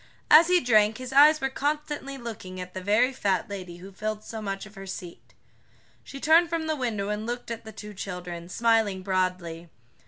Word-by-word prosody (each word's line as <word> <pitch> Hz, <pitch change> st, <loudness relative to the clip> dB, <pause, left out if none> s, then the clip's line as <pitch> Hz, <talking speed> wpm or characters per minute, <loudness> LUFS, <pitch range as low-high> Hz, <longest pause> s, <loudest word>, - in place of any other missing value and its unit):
As 320 Hz, +2 st, +9 dB
he 360 Hz, 0 st, +5 dB
drank 220 Hz, -5 st, +3 dB
his 255 Hz, 0 st, -7 dB
eyes 300 Hz, +3 st, +7 dB
were 270 Hz, -1 st, -1 dB
constantly 290 Hz, -1 st, -3 dB
looking 210 Hz, -7 st, -7 dB
at 180 Hz, 0 st, -7 dB
the 185 Hz, -, -5 dB
very 215 Hz, +7 st, +2 dB
fat 195 Hz, -7 st, 0 dB
lady 185 Hz, -4 st, -7 dB
who 190 Hz, +3 st, -11 dB
filled 215 Hz, +2 st, -4 dB
so 220 Hz, 0 st, -7 dB
much 195 Hz, -1 st, -4 dB
of 210 Hz, -, -14 dB
her 195 Hz, -1 st, -10 dB
seat. 175 Hz, -2 st, -9 dB, 0.7 s
She 275 Hz, -, -9 dB
turned 325 Hz, +4 st, +5 dB
from 330 Hz, -1 st, -2 dB
the 315 Hz, 0 st, 0 dB
window 220 Hz, -7 st, -2 dB
and 210 Hz, +1 st, -3 dB
looked 240 Hz, 0 st, -4 dB
at 230 Hz, -1 st, -6 dB
the 220 Hz, -, -8 dB
two 210 Hz, 0 st, -9 dB
children, 180 Hz, -3 st, -6 dB
smiling 220 Hz, -3 st, +1 dB
broadly. 185 Hz, -3 st, -2 dB
215 Hz, 195 wpm, -26 LUFS, 185-265 Hz, 0.7 s, As